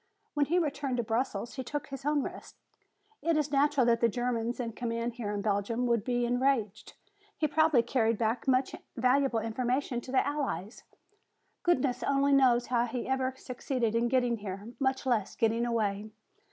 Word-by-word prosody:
When 290 -2 +1
he 345 - +2
returned 285 -6 -1
to 240 - 0
Brussels 230 +1 -2
he 260 - -3
took 290 +3 -4
his 275 0 -7
own 295 -2 +2
risk. - - -8 0.6
It 330 0 +1
is 300 -2 0
natural 280 -2 +3
that 230 -1 +3
the 235 - +4
Germans 240 0 -2
in 235 -2 -2
command 230 +1 -3
here 230 -3 -4
in 205 -1 -3
Belgium 215 +4 0
should 235 -3 +1
be 245 0 0
enraged. 245 -4 0 0.4
He 310 - +1
probably 300 -4 +3
carried 230 -2 +1
back 225 +2 -1
much 260 0 +2 0.2
valuable 255 +1 +2
information 245 +3 -1
to 255 - -9
the 260 - +3
Allies. 265 - -3 0.8
Goodness 265 -7 +1
only 280 0 +2
knows 250 -3 +4
how 240 -1 +1
he 240 +1 -4
ever 265 0 0
succeeded 250 -3 -2
in 230 +1 +2
getting 245 -2 +1
here, 205 +1 -7
much 265 -1 0
less 225 -6 0
getting 230 +1 +1
away!" 215 -2 -1
245 Hz, 175 wpm, -30 LUFS, 230-270 Hz, 0.8 s, the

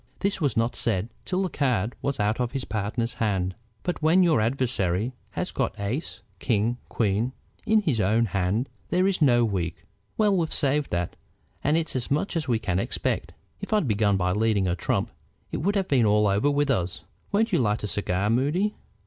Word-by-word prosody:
This 200 -2 0
was 145 -6 +1
not 115 +1 +1
said 105 -1 0 0.2
till 190 +1 0
the 185 - -1
card 125 - 0
was 140 -3 -2
out 105 +3 +1
of 125 0 -1
his 135 -2 -2
partner's 110 +3 -2
hand. 95 -4 0 0.3
"But 180 - -2
when 165 +4 +5
your 160 -10 +4
adversary 115 -3 0 0.2
has - - -3
got - - -2
ace, 115 +11 -3 0.2
king, 115 0 0
queen 110 +3 0 0.3
in 215 0 +4
his 140 - +1
own 110 +5 +3
hand 100 +5 0 0.2
there 180 +1 +2
is 195 -3 +1
no 120 -5 +5
weak. 90 -4 -3 0.3
Well, 210 -2 +3
we've 165 -3 0
saved 145 0 +2
that, 85 0 -2 0.5
and 150 +3 +3
it's 165 -4 -2
as 125 -2 -1
much 150 +7 0
as 160 -4 -1
we 120 -3 +2
can 95 -4 -1
expect. - - -2 0.2
If - - -4
I'd 210 -9 +2
begun 105 -2 +2
by 90 -1 +1
leading 105 -1 +2
a 90 - +1
trump - - -1 0.4
it - - -2
would 200 +6 0
have 195 -2 +1
been 125 -6 +3
all 105 0 +4
over 100 +8 +2
with 145 0 +2
us. 90 -7 -2 0.3
Won't 220 +2 +2
you 175 - +4
light 105 -4 +1
a - - -1
cigar, 100 +1 -1
Moody?" 150 - +1
120 Hz, 200 wpm, -26 LUFS, 100-150 Hz, 0.5 s, when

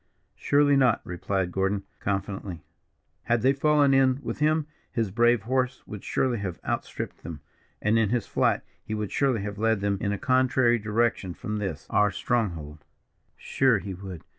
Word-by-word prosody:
"Surely 145 0 +3
not," 130 -4 +4
replied 90 +1 -2
Gordon, 95 +2 0 0.2
confidently. 95 -3 -3 0.6
"Had 120 -1 +1
they 135 +1 +5
fallen 145 0 +3
in 130 -1 +4
with - - -4
him, 155 0 +2 0.3
his 115 -4 -1
brave 120 +1 +3
horse 130 +1 -1
would 105 -2 -8
surely 125 -4 0
have 95 -4 -4
outstripped - - -4
them, 80 -3 -8 0.4
and 105 +2 +3
in 110 -3 +2
his 120 -2 0
flight - - +1 0.2
he 110 - -4
would 105 -2 -3
surely 130 -6 +1
have 105 0 -5
led 110 -1 +2
them 100 -1 -1
in 100 - 0
a 105 - -1
contrary 130 -1 +3
direction 105 -4 0
from 105 0 -4
this, 100 -2 -4
our 105 0 +4
stronghold." 85 -9 -2 0.5
"Sure 130 -4 +2
he 95 0 -6
would. 95 -2 -8
110 Hz, 165 wpm, -26 LUFS, 100-130 Hz, 0.6 s, they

